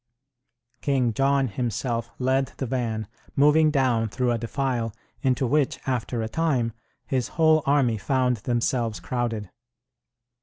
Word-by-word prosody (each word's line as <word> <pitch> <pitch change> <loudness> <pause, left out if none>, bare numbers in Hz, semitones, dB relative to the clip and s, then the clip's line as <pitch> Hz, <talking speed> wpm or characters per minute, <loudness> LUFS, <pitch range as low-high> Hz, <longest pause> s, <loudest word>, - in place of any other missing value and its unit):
King 130 -5 +1
John 135 +2 +2
himself 115 +1 -2
led 130 +1 +1
the 135 - -2
van, 115 -4 -2 0.3
moving 150 +2 +5
down 125 -6 +2
through 125 +2 0
a 120 - +1
defile, 120 -2 -2 0.3
into 130 0 +1
which, 140 +2 +1
after 120 -2 -1
a - - -2
time, 125 -4 0 0.3
his 130 -3 -1
whole 160 -1 +5
army 130 -6 +3
found 125 +2 +1
themselves 120 0 -1
crowded. 115 -6 -3
125 Hz, 125 wpm, -25 LUFS, 115-135 Hz, 0.3 s, moving